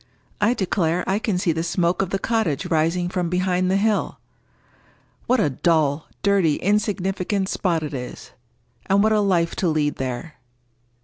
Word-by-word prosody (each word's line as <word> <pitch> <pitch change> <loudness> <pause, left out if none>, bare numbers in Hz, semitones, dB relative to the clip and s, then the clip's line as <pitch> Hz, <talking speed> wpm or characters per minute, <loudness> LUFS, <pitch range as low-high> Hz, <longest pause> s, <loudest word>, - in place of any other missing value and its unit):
I 225 +4 +3
declare, 180 -3 0
I 195 +2 0
can 210 -4 -1
see 180 -1 +1
the 165 +1 -1
smoke 170 +1 0
of 195 - -1
the 195 - 0
cottage 195 - -1
rising 165 +3 +1
from 180 -1 -2
behind 180 0 +1
the 190 - +2
hill! 210 +1 0 1.1
What 255 0 +3
a 170 -9 +2
dull, 155 0 +1 0.2
dirty, 195 -7 +3
insignificant 195 -1 0
spot 170 -4 0
it 150 - -5
is! 125 -2 -7 0.6
And 200 +1 +3
what 220 - +3
a 215 - +3
life 175 -4 +1
to 185 - +1
lead 150 -2 0
there!" 130 +4 -5
180 Hz, 165 wpm, -22 LUFS, 160-200 Hz, 1.1 s, I